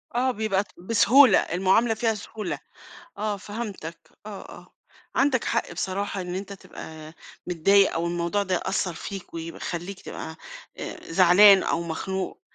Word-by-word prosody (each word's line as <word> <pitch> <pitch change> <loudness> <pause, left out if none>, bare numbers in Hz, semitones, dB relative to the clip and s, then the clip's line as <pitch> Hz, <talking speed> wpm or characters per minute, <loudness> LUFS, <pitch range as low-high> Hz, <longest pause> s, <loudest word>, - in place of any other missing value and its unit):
آه، 255 +1 +2
بيبقى 210 -3 0
ت - - -27
بسهولة، 230 +5 +5
المعاملة 190 +6 +2
فيها 225 0 0
سهولة، 215 0 -6 0.6
آه 210 -1 -1
فهَمتك، 205 -5 -7 0.3
آه، 205 -2 -7 0.2
آه، - - -18 0.4
عندَك 265 -3 +2
حق - - -1
بصراحة 195 +2 -3
إن 180 0 -5
أنت 200 +1 -5
تبقى 160 -4 -10 0.3
متضايق 195 +3 +4
أو 165 +1 -1
الموضوع 175 +4 -1
ده 185 -2 -1
يأثّر 180 0 -1
فيك 195 -2 -8
ويبق 165 0 -6
يخلّيك 175 +3 -5
تبقى 160 0 -8 0.4
آآ - - -7
زعلان 190 +3 +7
أو 170 - -1
مخنوق. 190 +3 -4
190 Hz, 145 wpm, -25 LUFS, 175-210 Hz, 0.6 s, زعلان